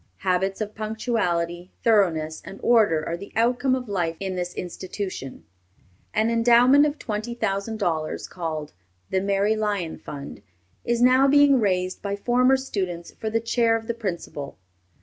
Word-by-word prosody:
Habits 190 +2 0
of 210 0 -3
punctuality, 185 -6 -2
thoroughness, 165 -8 +2
and 195 - -10
order 205 -10 +4
are 170 - -1
the 200 +4 -10
outcome 245 +3 +2
of 250 -2 -5
life 175 -5 -1
in 190 -1 -3
this 180 0 -4
institution. 180 -5 -6 0.7
An 220 +2 +1
endowment 245 +5 +5
of 295 0 -4
twenty 215 +2 -4
thousand 220 0 -2
dollars, 160 -6 -2
called 160 -4 -5 0.4
"the 190 - +1
Mary 200 +2 +1
Lyon 205 -6 -2
Fund," 140 -7 -8 0.4
is 235 0 +1
now 255 +2 +6
being 285 -1 +5
raised 185 -3 0
by 200 -1 -2
former 250 +5 +3
students 185 -10 -4
for 220 - -5
the 225 +1 +1
Chair 230 0 +2
of 225 0 -4
the 235 - -2
Principal. 170 -10 -5
205 Hz, 150 wpm, -24 LUFS, 180-235 Hz, 0.7 s, now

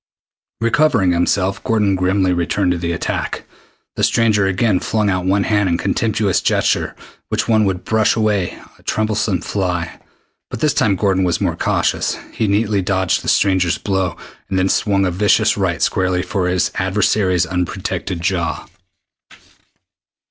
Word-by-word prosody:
Recovering 115 -5 +2
himself, 90 +3 0
Gordon 105 -3 +1
grimly 95 0 +1
returned 90 +2 0
to 90 - 0
the 85 0 -2
attack. 85 - -3 0.5
The - - -2
stranger 105 -4 +3
again 95 0 +1
flung 105 -2 0
out 95 -1 -1
one 100 +1 +2
hand 105 -2 +1
in 85 - +1
the - - -7
contemptuous 105 0 0
gesture - - 0
with - - -19 0.2
which - - -7
one 110 -2 +3
would 95 -2 -2
brush 110 -1 +2
away 105 -5 0 0.2
a - - -21
troublesome 110 -4 -1
fly, 90 -3 -3 0.5
but - - -6
this 150 +3 +2
time 100 -3 +2
Gordon 95 -1 +1
was 90 -2 0
more - - -1
cautious. - - 0 0.2
He 110 - -1
neatly 105 0 +1
dodged 95 -1 0
the - - -9
stranger's 95 -3 +2
blow, 95 -4 -2 0.3
then 95 0 +1
swung 100 -1 +1
a 90 - 0
vicious 100 +3 +2
right - - -1
squarely 90 -1 0
for 95 -3 -2
his 90 0 0
adversary's 95 -1 +1
unprotected 90 0 -3
jaw. 85 -1 -1
95 Hz, 155 wpm, -18 LUFS, 90-105 Hz, 0.5 s, stranger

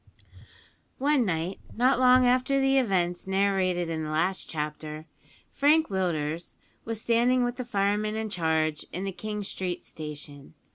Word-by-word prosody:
One 275 -2 +2
night, 170 +2 -2 0.2
not 250 +2 +3
long 255 0 +6
after 255 +2 +3
the 270 0 +4
events 180 -7 0
narrated 190 -2 +1
in 160 -1 -3
the 155 - -4
last 170 +5 -1
chapter, 155 0 -5 0.5
Frank 310 +3 +3
Willders 170 -4 -2 0.3
was 225 -1 -4
standing 240 +2 +2
with 245 0 -2
the 255 - -4
fireman 210 -1 0
in 220 -1 -3
charge 160 -4 0
in 185 - -3
the 195 - -2
King 210 +2 -5
Street 185 -2 -3
Station. 150 -1 -8
195 Hz, 145 wpm, -27 LUFS, 160-245 Hz, 0.5 s, long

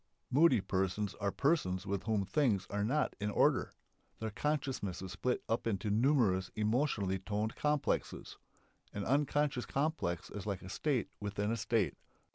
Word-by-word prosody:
Moody 135 -4 +5
persons 95 +2 -1
are 100 0 +1
persons 95 - +1
with 100 -1 -2
whom 105 -3 +1
things 100 -3 +2
are 100 0 0
not 135 +7 +1
in 105 +1 -1
order. - - +2 0.5
Their 110 -1 -4
consciousness 135 - -2
is 95 - -6
split 125 +6 -1
up 115 +1 0
into 105 -1 -1
numerous 110 -6 +3
emotionally 110 -3 +1
toned 105 +3 -2
"complexes." 150 -1 -1 0.5
An 100 -1 -3
unconscious 145 -1 +1
complex 135 - -1
is 105 0 -6
like 100 -2 -3
a 90 - -8
state 135 +2 0
within 105 +1 -2
a - - +1
state. 115 -2 0
105 Hz, 150 wpm, -34 LUFS, 100-135 Hz, 0.5 s, Moody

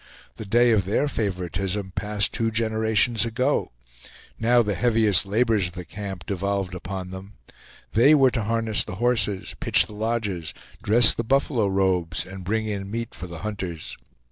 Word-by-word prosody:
The 110 - -7
day 120 +3 +4
of 105 -4 +2
their 110 +9 +1
favoritism 95 - -3
passed 105 +1 -1
two 115 -1 0
generations 110 0 +1
ago; 120 +2 0 0.7
now 120 +1 +4
the 105 -1 -1
heaviest 110 -4 +2
labors 110 -2 +2
of 85 - -10
the 90 0 -7
camp 95 -1 -7
devolved 100 -1 -2
upon 90 0 -6
them; 95 +2 -9 0.6
they 135 +7 +6
were 135 -3 +5
to 115 -4 -2
harness 115 -1 0
the 100 - -7
horses, 105 -4 0
pitch - - +3
the - - -12
lodges, 105 -7 -3 0.3
dress 110 +1 +5
the 115 - -3
buffalo 125 -2 +1
robes, 95 -3 0
and 95 0 -9
bring 110 +4 -1
in 100 -2 -4
meat 115 +1 -4
for 90 - -8
the 85 -1 -9
hunters. 95 -7 -5
105 Hz, 165 wpm, -24 LUFS, 95-115 Hz, 0.7 s, they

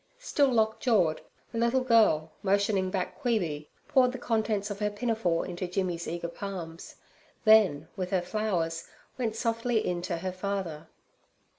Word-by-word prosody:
Still 305 - +2
lock 220 -2 +2
jawed, 190 -11 +2 0.3
the 230 - -3
little 235 +3 +2
girl, 215 -11 +4
motioning 200 -1 +2
back 185 +8 -3
Queeby, 175 - -1 0.2
poured 255 -2 +4
the - - -4
contents 220 -3 -1
of 200 - -5
her 210 -1 +1
pinafore 205 -6 0
into 180 0 -4
Jimmy's 180 -2 -2
eager 170 0 -3
palms; 170 -2 -7 0.5
then, 200 -9 +5
with 185 -3 -3
her 185 -2 +1
flowers, 175 -5 -1 0.3
went 225 -3 -1
softly 230 0 0
in 175 -1 -1
to 175 -1 -2
her 185 +2 -3
father. 185 -4 -4
200 Hz, 150 wpm, -29 LUFS, 175-225 Hz, 0.5 s, then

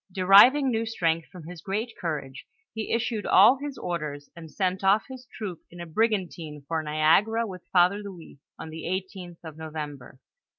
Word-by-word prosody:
Deriving 205 +10 +6
new 225 -1 0
strength 165 -8 -1
from 180 -3 -12
his 170 +1 -10
great 215 +4 -3
courage, 140 -6 -5 0.3
he 220 -1 -5
issued 230 -2 -1
all 215 +8 +6
his 285 -1 -6
orders 150 -5 -5
and 165 -2 -10
sent 185 +3 -2
off 195 +3 +4
his 260 -2 -11
troop 195 -7 -6
in 175 - -13
a 170 - -6
brigantine 170 -6 -2
for 160 0 -1
Niagara 160 +10 +2
with 185 -4 -10
Father 180 +2 +4
Louis, 190 -8 -11 0.2
on 160 - -8
the 160 0 -8
18th 185 -1 -5
of 160 -2 -10
November. 150 -5 -7
180 Hz, 170 wpm, -26 LUFS, 160-215 Hz, 0.3 s, Deriving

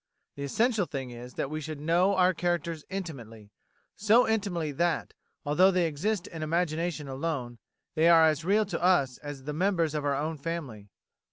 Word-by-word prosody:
The 140 - -8
essential 220 - +1
thing 135 -3 -5
is 120 +1 -10
that 140 - -3
we 155 0 -3
should 155 0 -6
know 175 +6 +2
our 185 0 +4
characters 170 -2 -2
intimately, 120 - -7 0.4
so 220 +4 +4
intimately 195 -8 -1
that, 170 +4 -1 0.3
although 170 +6 +5
they 180 -2 +2
exist 175 +6 -1
in 160 - -8
imagination 160 -1 -1
alone, 135 -4 -4 0.3
they 160 +2 +4
are 165 -1 +7
as 155 0 +1
real 205 +5 +3
to 180 -4 -4
us 155 -9 +2
as 145 -2 -8
the 150 +2 -4
members 170 -2 +1
of 150 -1 -2
our 140 -1 +1
own 155 +2 -3
family. 140 -10 -5
160 Hz, 175 wpm, -28 LUFS, 145-180 Hz, 0.4 s, are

